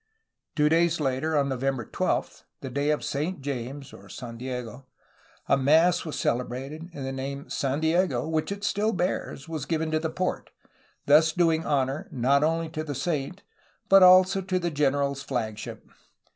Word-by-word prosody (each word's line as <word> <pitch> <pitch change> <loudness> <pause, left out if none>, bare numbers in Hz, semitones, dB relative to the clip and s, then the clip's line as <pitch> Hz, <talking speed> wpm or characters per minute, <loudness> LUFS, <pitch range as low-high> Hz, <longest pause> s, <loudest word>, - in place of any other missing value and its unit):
Two 150 -1 +3
days 165 +1 +3
later, 145 +2 0
on 140 -1 +2
November 135 -2 -2
12, - - -2 0.2
the 135 - -6
day 140 +3 0
of 150 - 0
Saint 155 +6 -2
James 135 0 -5 0.2
(San 120 -3 -8
Diego), 125 0 -6 0.6
a - - +4
mass 160 +7 +3
was 155 - -5
celebrated, 135 +7 -3
and 140 -5 -6
the 135 - -3
name 140 +1 -5
"San 135 +1 -1
Diego, 160 -6 +1
'^ - - -4
which 160 +3 -1
it 200 0 -5
still 210 +1 0
bears, 175 -6 -2
was 155 -4 -5
given 160 -1 -1
to 155 - +1
the 160 0 -2
port, 185 +3 -3 0.6
thus 155 +3 +5
doing 165 -2 +2
honor 135 0 0
not 135 +3 +2
only 165 +1 +1
to 155 0 -5
the 145 -2 -5
saint 150 +4 -3 0.5
but 195 0 +8
also 185 +1 +7
to 185 0 -1
the 175 -1 -1
generaFs 140 -1 0
flagship. 110 -6 -5
150 Hz, 170 wpm, -26 LUFS, 135-165 Hz, 0.6 s, but